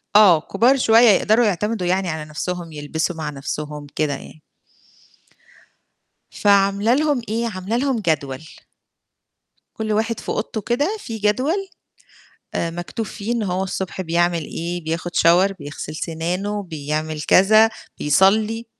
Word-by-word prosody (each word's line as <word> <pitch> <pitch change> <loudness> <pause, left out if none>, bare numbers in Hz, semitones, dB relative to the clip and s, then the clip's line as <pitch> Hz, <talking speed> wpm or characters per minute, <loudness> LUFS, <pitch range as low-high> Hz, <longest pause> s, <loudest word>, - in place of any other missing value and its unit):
آه، 190 -7 +7
كُبار 240 - +2
شوية 230 -1 +6
يقدروا 220 +3 +4
يعتمدوا 210 0 -1
يعني 185 0 0
على 155 -1 -4
نفسهم، 175 +2 -4
يلبسوا 155 +3 -3
مع 155 -2 -4
نفسهم 150 +1 -6
كده 150 -2 0
يعني. 155 - -10 1.9
فعاملة 200 +2 +3
لهم 290 -3 +1
إيه، 230 +2 -1
عاملة 200 +1 -3
لهم 265 -2 0
جدول. 145 -8 -1 1.3
كُلّ 220 -1 -2
واحد 220 +1 -1
في - - -8
أوضته 215 0 -3
كده 290 - -1
في 225 - -6
جدول؟ 260 - 0 0.9
آآ، 170 - -1
مكتوب 175 +6 -5
فيه 210 +3 -4
إن 235 -2 -1
هو 185 -2 -1
الصبح 190 0 -4
بيعمل 170 -1 +1
إيه 170 +3 -5
بياخد 165 +2 -3
shower 180 +4 +4
بيغسل 145 +1 -7
سنانه، 180 +6 -3
بيعمل 155 -2 -4
كذا، 215 +6 +5 0.3
بيصلّي. 215 +9 +2
190 Hz, 130 wpm, -21 LUFS, 160-220 Hz, 1.9 s, آه